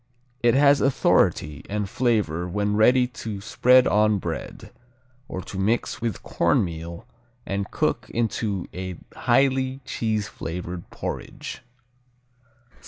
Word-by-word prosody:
It 120 0 +4
has 140 0 +5
authority 75 - +2
and 105 0 -1
flavor 105 -8 0
when 105 +3 0
ready 125 +4 +5
to 115 -4 -6
spread 125 +5 +4
on 105 0 +3
bread, 85 -3 -6 0.6
or 95 - -5
to 95 - -7
mix 110 +5 0
with 115 -6 -3
cornmeal 85 +3 -1 0.4
and 100 0 -2
cook - - -1
into 110 -4 -1
a 95 0 -5 0.2
highly 130 +1 +2
cheese 110 -5 -1
flavored 85 +1 -6
porridge. - - -6
105 Hz, 110 wpm, -24 LUFS, 95-120 Hz, 0.6 s, has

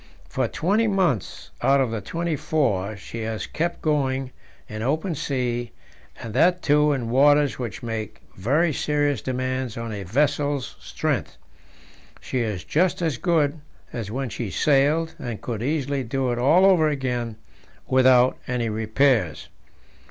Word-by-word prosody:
For 130 -2 -1
twenty 205 - +1
months 180 - -1
out 140 0 +4
of 115 -6 -1
twenty 170 -1 -2
four 110 -10 0
she 115 +3 -8
has 110 -1 -3
kept 170 +2 -3
going 135 -4 0 0.4
in 110 0 -6
open 155 - 0
sea, 120 -5 -2 0.5
and 115 -2 -7
that, 175 +7 +3
too, 150 0 +4
in 120 -5 -2
waters 145 +2 +4
which 120 -4 -5
make 115 -3 -5 0.2
very 150 - +1
serious 145 -3 0
demands 130 -2 -3
on 115 -1 -4
a 105 -2 -5
vessel's 145 +6 0
strength. - - -3 0.8
She 130 - -3
is 105 -6 -2
just 180 +2 +1
as 155 -8 -1
good 160 -4 +1 0.3
as 115 -5 -4
when 130 +3 -3
she 110 +1 -4
sailed, 150 - +2
and 120 -4 -5
could 115 -3 -4
easily 140 0 -1
do 130 +1 -1
it 120 - -2
all 160 +9 +5
over 175 -5 +5
again 125 -5 -2 0.5
without 130 -1 +4
any 120 -3 -1
repairs. 110 - +1
130 Hz, 145 wpm, -24 LUFS, 115-150 Hz, 0.8 s, all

